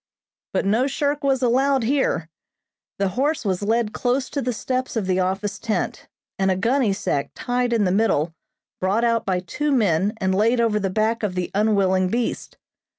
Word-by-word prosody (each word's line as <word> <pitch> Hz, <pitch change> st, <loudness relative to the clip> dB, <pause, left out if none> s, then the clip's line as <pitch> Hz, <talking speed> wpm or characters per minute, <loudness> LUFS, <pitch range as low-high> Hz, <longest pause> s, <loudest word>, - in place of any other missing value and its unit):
But -, -, 0 dB
no 225 Hz, +7 st, +2 dB
shirk 285 Hz, +1 st, -1 dB
was 270 Hz, -2 st, +1 dB
allowed 265 Hz, +2 st, +2 dB
here. 245 Hz, -, 0 dB, 0.7 s
The 195 Hz, -1 st, +1 dB
horse 275 Hz, -, -1 dB
was 190 Hz, -2 st, 0 dB
led 220 Hz, +1 st, 0 dB
close 255 Hz, +1 st, -1 dB
to 280 Hz, -, -2 dB
the 250 Hz, -, -1 dB
steps 255 Hz, +2 st, -3 dB
of 220 Hz, -4 st, -1 dB
the 185 Hz, 0 st, +1 dB
office 195 Hz, +2 st, -1 dB
tent, 220 Hz, -, -3 dB, 0.3 s
and 190 Hz, 0 st, +2 dB
a 190 Hz, -, +2 dB
gunny 235 Hz, +4 st, +1 dB
sack 145 Hz, -7 st, -1 dB
tied 245 Hz, 0 st, -1 dB
in 230 Hz, -3 st, +2 dB
the 185 Hz, -, +2 dB
middle 180 Hz, -6 st, +1 dB, 0.5 s
brought 195 Hz, +5 st, +1 dB
out 230 Hz, -1 st, +1 dB
by 185 Hz, -2 st, +1 dB
two 295 Hz, +12 st, -2 dB
men 205 Hz, -, +2 dB
and 190 Hz, -3 st, 0 dB
laid 225 Hz, +5 st, +2 dB
over 225 Hz, -2 st, +2 dB
the 195 Hz, -1 st, -1 dB
back 220 Hz, +4 st, 0 dB
of 200 Hz, -4 st, -2 dB
the 180 Hz, -1 st, -2 dB
unwilling 195 Hz, -3 st, +2 dB
beast. 235 Hz, +3 st, -3 dB
220 Hz, 185 wpm, -22 LUFS, 190-250 Hz, 0.7 s, no